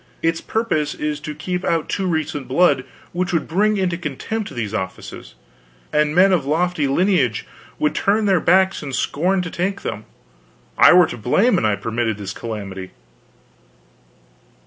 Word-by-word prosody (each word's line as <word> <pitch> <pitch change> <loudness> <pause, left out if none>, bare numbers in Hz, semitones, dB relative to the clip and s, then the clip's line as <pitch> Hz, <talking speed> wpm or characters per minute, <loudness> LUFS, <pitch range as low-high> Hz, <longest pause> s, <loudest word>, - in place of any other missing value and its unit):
Its 165 0 +1
purpose 220 -10 -1
is 150 0 -3
to 150 0 -7
keep 180 +4 -3
out 165 -2 0
too 190 -2 -2
recent 155 -5 -2
blood, 135 -1 +3 0.3
which 180 +2 -1
would 165 -3 0
bring 210 +5 +2
into 180 -3 -1
contempt 195 - -4
these 110 -3 -4
offices, 95 -3 -6 0.6
and 150 0 +2
men 190 +2 +6
of 170 -6 +2
lofty 160 +1 0
lineage 140 - +1 0.3
would 150 - +1
turn 210 +2 +1
their 190 -3 +3
backs 190 +3 +3
and 140 -3 -5
scorn 180 +8 0
to 175 - -6
take 195 +3 -2
them. 105 - -5 0.7
I - - +7
were 180 0 +7
to 120 - -6
blame 190 - +2
an - - -1
I 105 -1 +2
permitted 115 0 -2
this 100 -2 -6
calamity. 100 -5 -6
160 Hz, 160 wpm, -20 LUFS, 130-185 Hz, 0.7 s, I